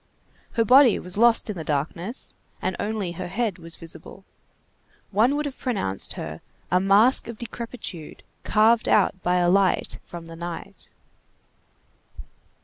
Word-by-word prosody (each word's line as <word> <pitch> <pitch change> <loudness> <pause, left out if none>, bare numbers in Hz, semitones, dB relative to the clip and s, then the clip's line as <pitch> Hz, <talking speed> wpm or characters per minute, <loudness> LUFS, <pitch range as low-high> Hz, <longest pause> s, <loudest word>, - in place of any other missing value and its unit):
Her 230 -2 +2
body 255 -1 +7
was 180 +3 +1
lost 235 0 +5
in 210 - -4
the 165 - -5
darkness, 165 - -3 0.3
and - - -2
only 205 -4 -2
her 175 +1 -6
head 205 0 -2
was 165 0 -10
visible. 165 -1 -9 0.9
One 225 +8 +3
would 300 +1 -1
have 280 -2 -6
pronounced 195 - -2
her - - -7 0.3
a 180 - +4
mask 205 +7 +4
of 235 -2 -7
Decrepitude 230 -8 -7 0.2
carved 225 +2 +3
out 190 -2 +3
by 180 +1 +1
a 175 -1 +3
light 190 0 +2
from 170 -1 -9
the 165 0 -9
night. 170 0 -8
195 Hz, 140 wpm, -24 LUFS, 175-230 Hz, 0.9 s, body